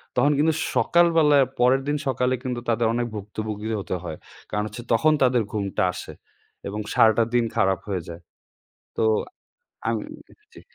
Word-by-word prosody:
তখন 145 - +3
কিন্তু 160 +1 +3 0.2
সকালবেলায় 160 -5 +4
পরের 130 +2 +4
দিন 150 0 +1
সকালে 130 0 +1
কিন্তু 125 -2 -3
তাদের 115 0 +2
অনেক 120 0 -1
ভুক্তভুগিও 105 +1 -4
হতে 95 - -3
হয়। 80 -3 -6 0.3
কারণ 105 0 -1
হচ্ছে 115 +3 -8
তখন 155 +8 +4
তাদের 125 -3 +3
ঘুমটা 100 -3 -1
আসে - - -8 0.5
এবং 105 +2 -4
সারাটা 115 0 +5
দিন 120 -1 +3
খারাপ 95 -2 +2
হয়ে 95 -3 -2
যায়। 85 +1 -9 0.8
তো - - +1 0.8
আমি - - 0 0.5
জি। - - -13
115 Hz, 150 wpm, -24 LUFS, 105-130 Hz, 0.8 s, সারাটা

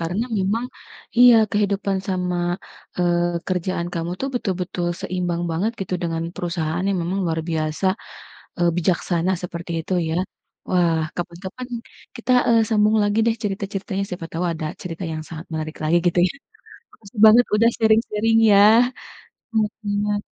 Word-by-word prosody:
karena 175 +7 -1
memang 205 +5 0 0.5
iya, 245 -1 +9 0.2
kehidupan 200 -1 0
sama, 180 -1 -1 0.6
eee, 175 -1 +1
kerjaan 180 -1 -1
kamu 170 0 -3
tuh 270 - -1
betul-betul 185 -5 -2
seimbang 175 -2 -2
banget 185 +8 0
gitu 185 -1 -3
dengan 165 -1 -2
perusahaan 170 -1 -2
yang 195 -2 +1
memang 180 +4 -2
luar 165 -1 -1
biasa, 155 +2 -2 0.7
eee, 175 0 +3
bijaksana 175 0 0
seperti 170 -1 -6
itu 175 +4 -3 0.2
ya. 160 - -1 0.5
Wah, 170 -3 +3 0.2
kapan-kapan 185 +8 -6 0.5
kita, 235 +2 -5 0.2
eee, 230 -1 +5
sambung 215 0 +3
lagi 205 +1 +1
deh 230 - +3
cerita-ceritanya 195 -1 -3
siapa 175 -2 -6
tahu 165 +2 -2
ada 160 -1 -4 0.2
cerita 180 0 -6
yang 155 - -4
sangat 160 0 -8
menarik 155 0 -4
lagi 160 +3 +3
gitu 175 0 +2
ya. - - -6 0.6
Makasih 210 +1 -12
banget 230 +3 +7
udah 230 +2 +5
sharing-sharing 225 0 +2 0.2
ya, 200 +1 +7 1.2
mhm. 205 0 -1
185 Hz, 140 wpm, -22 LUFS, 170-205 Hz, 1.2 s, iya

